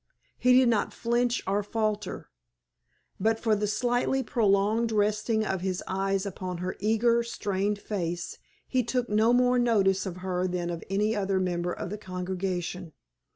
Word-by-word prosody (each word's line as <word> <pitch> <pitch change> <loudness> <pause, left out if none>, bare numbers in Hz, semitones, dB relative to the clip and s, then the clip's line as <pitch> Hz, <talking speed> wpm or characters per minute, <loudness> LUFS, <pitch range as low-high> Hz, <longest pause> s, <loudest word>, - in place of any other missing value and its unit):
He 250 0 +5
did 260 -1 +5
not 225 -3 +1
flinch 240 +1 0
or 200 +2 +1
falter. 215 0 -3 0.9
But 225 +1 +1
for 220 -2 +2
the 210 0 -1
slightly 245 +5 +1
prolonged 220 0 +2
resting 215 +1 +1
of 190 -3 -2
his 185 -1 -2
eyes 195 +1 -1
upon 185 -2 -5
her 180 +2 -3
eager, 225 +3 +3
strained 205 -3 -1
face 175 -4 -4 0.3
he 255 - +1
took 245 +1 -1
no 215 +2 +3
more 250 0 +4
notice 200 -5 +2
of 180 -1 -5
her 185 0 0
than 175 -1 -2
of 170 -1 -5
any 210 +3 +1
other 195 -2 0
member 175 -1 -1
of 175 - -5
the 210 - -5
congregation. 180 -2 -4
205 Hz, 155 wpm, -28 LUFS, 185-225 Hz, 0.9 s, He